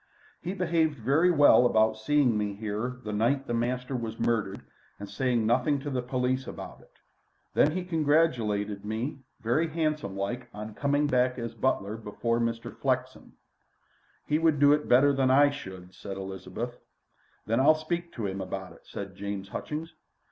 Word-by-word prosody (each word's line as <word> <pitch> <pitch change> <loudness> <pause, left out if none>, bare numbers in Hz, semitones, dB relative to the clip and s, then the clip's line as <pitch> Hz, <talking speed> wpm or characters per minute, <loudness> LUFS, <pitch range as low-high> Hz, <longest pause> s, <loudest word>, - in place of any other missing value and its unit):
"He 185 +3 -4
behaved 165 -5 +1
very 140 +10 +3
well 145 -6 +6
about 110 -1 +3
seeing 125 +2 +2
me 105 -1 -1
here 110 +4 -3
the 105 - -4
night 125 +6 +1
the 120 - -3
master 125 +2 -1
was 115 -2 -4
murdered 105 -4 0 0.4
and 100 - -6
saying 120 +2 0
nothing 130 +5 +2
to 145 0 -4
the 130 -1 -1
police 130 +1 -1
about - - -8
it. - - -21 0.6
An' - - +5
then - - -1
he 185 - -2
congratulated 125 - +1
me 115 +7 -3 0.2
very 125 +9 +1
handsomelike 130 - -2
on 105 +1 -6
coming 145 +4 +1
back 125 -2 +2
as 115 -2 -4
butler 110 -3 -1
before 115 +2 -2
Mr. 115 0 -2
Flexen." - - -2 0.9
"He 150 +1 +1
would 160 -3 +3
do 145 0 +7
it 150 0 -1
better 140 +3 +6
than 135 -1 +2
I 145 +2 +6
should," 95 -9 -9
said 95 0 -7
Elizabeth. 95 +5 -6 0.7
"Then 115 +3 +1
I'll 150 +4 +6
speak 170 +2 -3
to 115 - -4
him 95 0 -3
about - - -5
it," - - -21
said 100 -1 -7
James 100 0 -5
Hutchings. 155 - -5
125 Hz, 170 wpm, -28 LUFS, 105-145 Hz, 0.9 s, do